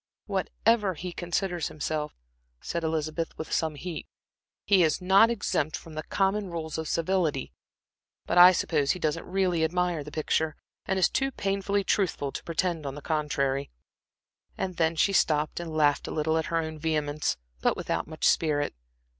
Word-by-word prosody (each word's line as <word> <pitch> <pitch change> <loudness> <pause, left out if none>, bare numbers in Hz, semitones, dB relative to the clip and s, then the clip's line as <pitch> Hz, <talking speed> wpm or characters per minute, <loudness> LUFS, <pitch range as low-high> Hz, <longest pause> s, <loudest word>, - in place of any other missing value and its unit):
"Whatever 205 0 +1
he 175 +3 -6
considers 175 -1 -2
himself," 150 0 -3 0.4
said 170 -1 -4
Elizabeth, 160 +1 -2
with 160 - -6
some 160 -2 0
heat, 165 +2 -6 0.6
"he 195 -3 +5
is 155 -3 +3
not 190 +5 +5
exempt 155 -9 -1
from 165 - -12
the 155 - -3
common 195 +3 0
rules 160 -2 -4
of 160 - -4
civility. 165 -5 0 0.7
But 175 - +3
I 180 +1 +11
suppose 150 -5 +1
he 185 - -7
doesn't 160 0 -1
really 180 -3 +1
admire 175 -1 0
the - - -8
picture, 155 0 0 0.3
and 190 - +1
is 185 - +5
too 270 0 0
painfully 200 -3 -1
truthful 180 -9 0
to - - -6
pretend 170 0 -1
to 140 -2 -4
the 145 - -7
contrary." 140 -3 -1 0.9
And 185 -2 -3
then 165 0 +2
she 195 +5 +2
stopped 155 -4 +2
and 170 -2 -5
laughed 150 -2 +2
a - - -4
little 160 +1 0
at 160 - -3
her 165 - 0
own 160 -1 -3
vehemence, 150 - -1 0.2
but - - +2
without - - -2
much 155 0 0
spirit. 150 -3 +2
165 Hz, 170 wpm, -28 LUFS, 155-185 Hz, 0.9 s, I